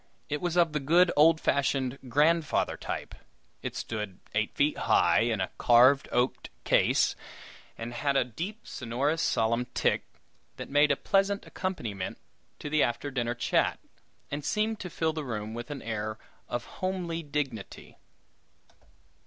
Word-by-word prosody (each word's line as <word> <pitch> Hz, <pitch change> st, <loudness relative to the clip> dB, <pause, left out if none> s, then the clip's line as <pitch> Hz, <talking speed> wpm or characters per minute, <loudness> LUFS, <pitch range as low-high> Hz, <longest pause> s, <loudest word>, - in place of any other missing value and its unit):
It 150 Hz, 0 st, -2 dB
was 175 Hz, -1 st, -1 dB
of 170 Hz, -3 st, +4 dB
the 150 Hz, -, +1 dB
good 170 Hz, +6 st, +4 dB
old 155 Hz, +2 st, +6 dB
fashioned 135 Hz, -2 st, 0 dB
"grandfather" 155 Hz, +4 st, +2 dB
type. -, -, -5 dB, 0.5 s
It -, -, -5 dB
stood 105 Hz, -4 st, -4 dB, 0.2 s
eight 110 Hz, +1 st, 0 dB
feet 145 Hz, +1 st, +2 dB
high, -, -, +3 dB
in 115 Hz, -2 st, +1 dB
a 95 Hz, -, -2 dB
carved 125 Hz, +4 st, +5 dB
oak 125 Hz, +1 st, 0 dB, 0.2 s
case, -, -, +3 dB, 0.6 s
and 115 Hz, +1 st, -6 dB
had 140 Hz, +3 st, 0 dB
a -, -, +4 dB
deep, 175 Hz, -, -6 dB
sonorous, 135 Hz, +7 st, -1 dB
solemn 115 Hz, -1 st, +1 dB
tick, -, -, +2 dB, 0.5 s
that -, -, -7 dB
made 145 Hz, +1 st, +5 dB
a 140 Hz, -, +4 dB
pleasant 195 Hz, +5 st, +1 dB
accompaniment 115 Hz, -, -4 dB, 0.4 s
to -, -, -7 dB
the 150 Hz, 0 st, +2 dB
after 130 Hz, +4 st, 0 dB
dinner 120 Hz, -2 st, -1 dB
chat, 120 Hz, -, +1 dB, 0.5 s
and 145 Hz, +1 st, -3 dB
seemed 215 Hz, +6 st, 0 dB
to 180 Hz, -, -5 dB
fill 160 Hz, -1 st, -1 dB
the 155 Hz, -1 st, -4 dB
room 110 Hz, -4 st, -4 dB
with 120 Hz, +1 st, -6 dB
an 145 Hz, -2 st, -6 dB
air 110 Hz, -1 st, -3 dB, 0.3 s
of 120 Hz, -, -3 dB
homely 180 Hz, -3 st, -3 dB
dignity. 140 Hz, -8 st, -5 dB
140 Hz, 150 wpm, -29 LUFS, 120-165 Hz, 0.6 s, old